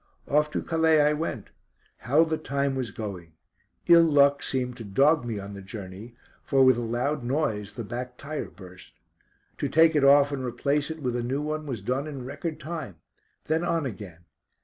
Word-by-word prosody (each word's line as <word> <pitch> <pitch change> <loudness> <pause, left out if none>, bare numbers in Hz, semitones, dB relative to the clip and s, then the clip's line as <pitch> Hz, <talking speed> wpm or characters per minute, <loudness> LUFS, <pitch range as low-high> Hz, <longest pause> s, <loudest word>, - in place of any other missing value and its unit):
Off 150 +1 +2
to - - -3
Calais 160 -1 +3
I 150 0 +4
went. 155 +2 -4 0.5
How 145 +8 +3
the 160 -1 -2
time 140 -2 -1
was 130 -3 -3
going. 95 -6 -7 0.5
Ill 170 -1 +8
luck 140 -3 +4
seemed 125 -2 -2
to 115 - -7
dog 140 +10 +3
me 115 -3 -3
on 100 0 -7
the 100 - -8
journey, 100 +3 -9 0.3
for 135 -1 +3
with 130 -2 +5
a - - -2
loud 120 +5 -1
noise 120 -6 -2
the 115 - -5
back 125 +3 -6
tyre 150 +2 -5
burst. 90 -1 -14 0.7
To - - -1
take 160 +1 +5
it 145 - +3
off 140 +1 +6
and 135 -2 -3
replace 140 +4 -1
it 160 -2 -7
with 125 -1 -1
a 120 - -1
new 130 +5 -2
one 155 0 -3
was 120 -7 -5
done 130 +6 -1
in 135 -4 -7
record 150 +4 -5
time. 155 - -6 0.5
Then 160 +2 0
on 165 -3 0
again. 95 -8 -8
135 Hz, 195 wpm, -26 LUFS, 115-150 Hz, 0.7 s, Ill